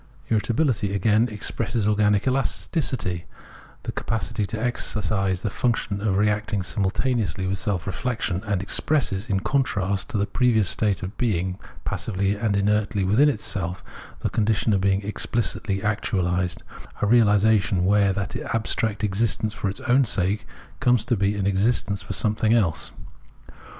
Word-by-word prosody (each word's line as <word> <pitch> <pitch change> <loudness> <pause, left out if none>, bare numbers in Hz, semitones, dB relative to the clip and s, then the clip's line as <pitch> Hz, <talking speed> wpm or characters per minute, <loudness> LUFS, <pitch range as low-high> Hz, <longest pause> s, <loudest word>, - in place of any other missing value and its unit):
Irritabihty, 110 -2 +1
again, 105 +4 +3
expresses 105 +1 -2
organic 105 -1 +2
elasticity, 110 - -1 0.6
the - - -3
capacity 105 -1 -2
to 110 - -4
exercise 100 -5 -1
the 105 - -1
function 105 -5 -1
of 100 -3 +1
reacting 105 -1 0
simul 95 +1 0
taneously 105 -6 -1
with 95 +1 -1
self 95 -4 -1
reflexion, 100 -2 -2
and 100 -2 0
expresses, 110 -3 0
in 95 -1 +1
contrast 100 -8 0
to - - -2
the 100 - +1
previous 110 -3 +2
state 105 -4 0
of 95 +3 -6
being 95 -5 0 0.3
passively 100 -2 -1
and 105 -1 0
inertly 105 0 +1
within 110 +11 +4
itself, 95 -8 -3 0.4
the - - 0
condition 110 0 +1
of 95 - +1
being 95 0 +2
exphcitly 105 -2 -1
actuahsed 90 -4 -1 0.2
— - - -18
a - - +4
reahsation, 105 -4 +4
where 100 +1 +3
that 100 0 -3 0.2
abstract 110 -1 0
existence 105 +1 0
for 105 - -2
its 95 - -5
own 130 +2 +3
sake 100 -1 0 0.3
comes 125 -4 +3
to 120 - +1
be 100 0 +1
an 100 -2 -2
existence 100 +1 +1
for - - -5
something 110 +2 +2
else. 95 -9 0
105 Hz, 145 wpm, -24 LUFS, 95-110 Hz, 0.6 s, within